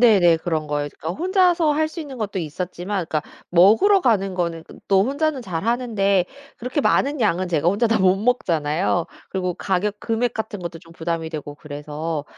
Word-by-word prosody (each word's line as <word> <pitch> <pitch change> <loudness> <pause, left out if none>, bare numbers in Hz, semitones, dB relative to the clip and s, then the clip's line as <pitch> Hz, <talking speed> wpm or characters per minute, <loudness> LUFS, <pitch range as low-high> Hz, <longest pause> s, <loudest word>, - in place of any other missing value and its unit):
네네. 190 -9 +6
그런 160 -2 -2
거예요. 145 0 -2
그러니까 165 +3 -5
혼자서 360 -4 +3
할 310 +1 +1
수 340 - -5
있는 280 -4 -7
것도 205 -3 -3
있었지만 180 +4 -4
그러니까 155 -1 -1 0.3
먹으러 220 - +6
가는 195 - +1
거는 170 -2 -2
그 - - -14
또 195 0 +4
혼자는 285 +1 0
잘하는데 200 0 +1 0.3
그렇게 255 +5 -2
많은 280 0 +2
양은 185 -4 +1
제가 165 0 +1
혼자 210 +5 +2
다 225 - +2
못 190 0 +4
먹잖아요. 175 -6 0 0.2
그리고 180 -2 -2
가격 200 +3 -1
금액 235 +1 0
같은 215 -2 -4
것도 170 -1 -6
좀 165 0 -17
부담이 165 -1 -3
되고 145 -2 -6
그래서 150 +1 -5
190 Hz, 395 characters per minute, -22 LUFS, 165-235 Hz, 0.3 s, 네네